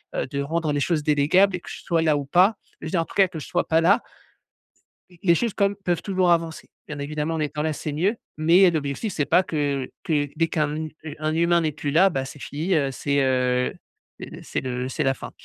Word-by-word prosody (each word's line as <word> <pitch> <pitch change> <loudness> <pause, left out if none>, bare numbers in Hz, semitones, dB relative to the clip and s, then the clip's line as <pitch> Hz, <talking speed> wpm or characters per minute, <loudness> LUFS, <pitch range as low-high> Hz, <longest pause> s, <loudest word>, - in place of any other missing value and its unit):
heu, - - -1
de 140 +1 -3
rendre 155 +1 -1
les 145 - 0
choses 160 +1 +1
délégables 155 +7 +3
et 180 - -6
que - - -11
je - - -8
sois 165 -2 +1
là 155 -2 +2
ou 145 - -4
pas 185 +8 +4 0.2
je - - -5
veux - - -6
dire, 170 - +2
en - - -3
tous - - -14
cas, 195 -1 +5
que 165 - -8
je - - -8
ne - - -13
sois 175 - 0
pas 160 - +3
là 180 +5 +4 1.1
les- 175 - -19
les 170 -3 +5
choses 230 +3 -1
quand 200 - +3
même 200 - -7
peuvent 180 -4 -2
toujours 185 -3 +1
avancer. 165 -1 0 0.2
Bien 150 -2 -6
évidemment, 150 +3 -3
en 160 - -2
étant 150 0 -2
là, 155 0 0
c'est 150 +1 -5
mieux, 185 +10 0 0.2
mais 170 +5 +5
heu, 175 - +5
l'objectif, 155 +6 -3
c'est 145 - 0
pas 180 - +4
que 145 -6 -2 0.2
que 145 -3 0
dès 165 0 +1
qu'un, 155 -3 0
mmh, 155 +1 -4 0.2
heu, 155 -2 -6
un 155 +1 -1
humain 170 +1 +3
n'est 155 -2 -1
plus 145 0 -4
là, 185 +6 +5
bah, 135 -4 -2
c'est 135 - -10
fini, 160 +8 -2
heu, 140 -3 +1
c'est 140 +1 0
heu 125 -1 +1 0.5
heu, - - -9
c'est - - -3
le 125 0 -3
c'est - - -2
la 135 - +2
fin. - - -9
155 Hz, 265 wpm, -24 LUFS, 145-175 Hz, 1.1 s, cas